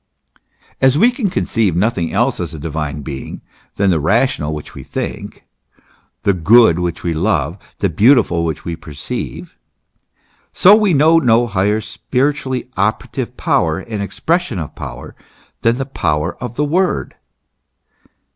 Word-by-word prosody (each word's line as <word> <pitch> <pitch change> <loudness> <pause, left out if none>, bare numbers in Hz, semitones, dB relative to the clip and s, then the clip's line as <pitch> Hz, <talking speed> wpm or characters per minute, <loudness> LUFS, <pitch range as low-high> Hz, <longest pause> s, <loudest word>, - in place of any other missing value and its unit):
As 130 +1 +4
we 235 +8 +5
can 240 -5 -2
conceive 110 - 0
nothing 90 -4 0
else 120 +8 +1
as 85 -2 -4
a - - -8
Divine 75 -1 -4
Being 65 0 -7 0.3
than 100 -1 +2
the 85 - +2
Rational 95 - +1
which 75 -1 -7
we - - -9
think, - - -6 0.8
the 100 - +3
Good 95 0 +5
which 85 -2 -3
we 85 - -1
love, 85 -1 0 0.2
the - - +1
Beau 125 +7 +5
tiful 85 -8 +1
which 80 -3 -3
we 85 - -3
perceive; 75 -3 -7 1.0
so 200 +3 +7
we 210 -6 +2
know 160 +3 +5
no 120 -4 +3
higher 105 0 0
spiritually 130 +4 -2
operative 105 +3 -2
power - - +1
and 110 -3 -5
expression 165 - -1
of 80 -4 -5
power, - - -8 0.5
than 115 +1 +2
the 135 - -2
power 80 - -1
of 125 -2 -6
the 150 - 0
Word. 180 +5 0
105 Hz, 145 wpm, -17 LUFS, 85-130 Hz, 1.0 s, so